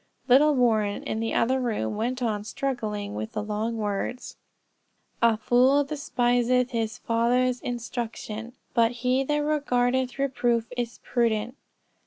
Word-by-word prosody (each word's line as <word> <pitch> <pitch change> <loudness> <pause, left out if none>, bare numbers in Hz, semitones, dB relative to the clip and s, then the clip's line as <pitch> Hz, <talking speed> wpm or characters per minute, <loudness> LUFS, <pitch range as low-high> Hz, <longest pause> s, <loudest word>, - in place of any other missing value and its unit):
Little 285 +4 +6
Warren, 220 -5 +2
in 220 - -3
the 225 0 -2
other 260 +3 +2
room, 215 - -1
went 245 +4 -2
on 210 -3 -1
struggling 215 -5 -3
with 220 +1 -5
the 210 -2 -2
long 215 +2 -2
words, 210 +3 -3 0.9
"A 230 -2 +4
fool 255 +6 +4
despiseth 250 -3 +1
his 225 -2 -2
father's 245 +2 +1
instruction: 235 -1 -5 0.2
but 230 -2 +4
he 255 +2 +3
that 295 +2 0
regardeth 260 -4 0
reproof 245 -4 +1
is 240 -1 -4
prudent." 235 0 0
240 Hz, 130 wpm, -26 LUFS, 220-255 Hz, 0.9 s, Little